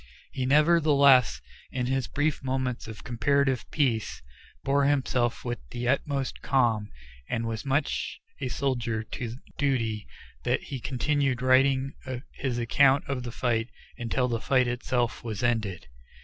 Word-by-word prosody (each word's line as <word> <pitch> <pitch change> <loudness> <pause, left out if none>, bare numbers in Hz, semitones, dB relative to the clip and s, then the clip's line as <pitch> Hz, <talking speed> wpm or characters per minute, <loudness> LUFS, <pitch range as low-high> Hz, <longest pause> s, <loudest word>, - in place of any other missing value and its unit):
He 130 -1 -2
nevertheless, 140 - +5 0.3
in 125 -1 -2
his 130 0 0
brief 145 0 -1
moments 130 -2 -2
of 110 -1 -9
comparative 130 +2 +1
peace, 125 -8 0 0.4
bore 140 +1 +2
himself 130 -4 +1
with 120 -1 -2
the 120 0 -4
utmost 140 0 -1
calm, 115 -6 +1 0.4
and 115 -1 -1
was 110 -1 -3
so 135 - -7
much 140 +2 -1 0.2
a 130 - -2
soldier 120 -4 -1
to 115 +1 -5 0.2
duty 115 -7 0 0.4
that - - 0
he 135 - -5
continued 135 0 0
writing 135 +1 +3 0.4
his 130 -3 -2
account 135 +4 +4
of 135 -2 -2
the 120 -1 -6
fight 115 -1 0 0.3
until 120 +2 -1
the 115 -2 -2
fight 130 -2 +3
itself 120 -1 -1
was 110 -2 -4
ended. 110 -7 0
125 Hz, 140 wpm, -27 LUFS, 120-140 Hz, 0.4 s, nevertheless